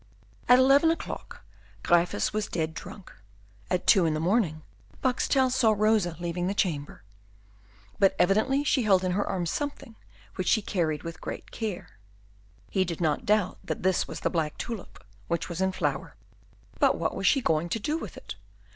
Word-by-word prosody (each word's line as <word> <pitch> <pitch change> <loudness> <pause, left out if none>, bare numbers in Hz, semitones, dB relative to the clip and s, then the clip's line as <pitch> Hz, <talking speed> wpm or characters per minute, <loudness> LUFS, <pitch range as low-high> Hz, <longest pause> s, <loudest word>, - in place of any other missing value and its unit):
At 250 - +9
eleven 275 +5 +5
o'clock 330 - -5 0.4
Gryphus 175 +3 +2
was 215 -1 -1
dead 160 -1 -2
drunk. 195 +3 -10 0.6
At 180 - -1
two 180 -4 +5
in 155 - 0
the - - -1
morning 170 -3 +1 0.4
Boxtel 260 0 +2
saw 235 -4 +3
Rosa 210 -5 +2
leaving 175 +1 -2
the 200 - -1
chamber; 150 - -2 1.0
but 195 -1 +4
evidently 220 +10 +2
she 285 -2 +2
held 195 -5 +3
in 185 - 0
her 200 +3 +1
arms 175 -3 -2
something 285 -6 -5 0.4
which 185 -2 -2
she 220 - +3
carried 160 -7 -1
with 165 0 -7
great - - -7
care. 210 - -6 0.7
He 190 - +2
did 170 -3 -5
not 155 -4 0
doubt 210 -3 +1
that - - -4
this 185 -1 +2
was - - -7
the - - 0
black 160 -4 -1
tulip 230 -6 -7 0.2
which 170 - -2
was 170 +1 -5
in 190 0 +2
flower. 185 - -3 0.6
But - - +4
what - - -2
was - - 0
she 275 - +4
going 160 -7 0
to 225 - -1
do 300 +9 -1
with 330 - -6
it? - - -8
190 Hz, 175 wpm, -27 LUFS, 170-225 Hz, 1.0 s, At